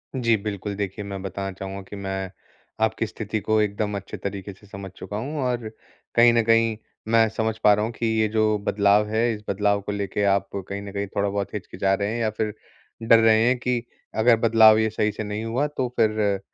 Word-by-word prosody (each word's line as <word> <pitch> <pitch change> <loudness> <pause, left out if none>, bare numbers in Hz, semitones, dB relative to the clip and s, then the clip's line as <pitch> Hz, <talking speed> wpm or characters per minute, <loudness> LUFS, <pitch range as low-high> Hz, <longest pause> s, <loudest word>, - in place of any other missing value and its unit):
जी, 115 -3 +2
बिल्कुल। 100 -1 -5
देखिए, 100 0 -4
मैं 100 -1 -6
बताना 95 0 -4
चाहूँगा 95 +1 -7
कि - - -7
मैं 95 -1 -4 0.5
आपकी 110 +1 +1
स्थिति 110 0 -4
को 110 +2 +1
एकदम 105 0 -1
अच्छे 100 - -8
तरीके 100 0 -5
से 105 +2 -20
समझ 100 -1 -8
चुका 105 - -6
हूँ 140 +8 -4
और 120 -3 -2 0.5
कहीं 120 0 +6
न 115 -1 +3
कहीं, 115 0 +3 0.3
मैं 115 0 +4
समझ 110 0 -2
पा 105 - +7
रहा 105 +1 +1
हूँ 115 - -3
कि 115 - -3
ये 110 - +3
जो 110 0 +2
बदलाव 100 +1 +3
है, 115 +2 +1
इस 105 - -7
बदलाव 100 +1 +1
को 105 - -5
लेके 100 0 -2
आप 100 -1 +2 0.2
कहीं 100 0 -4
न 100 - -8
कहीं 100 0 -2
थोड़ा-बहुत 100 0 -1
हिचकिचा 95 -1 -1
रहे 100 +1 -1
हैं 120 - -3
या 110 - +1
फिर 110 0 -3 0.5
डर 115 0 +6
रहे 110 0 +5
हैं 125 +1 +3
कि, 125 -1 -1 0.3
अगर 115 +2 +5
बदलाव 110 -1 +6
ये 110 0 +2
सही 105 0 0
से 105 - -5
नहीं 105 +1 -4
हुआ, 125 +6 0
तो 140 -3 -2
फिर 105 -2 +2
105 Hz, 215 wpm, -24 LUFS, 100-115 Hz, 0.5 s, पा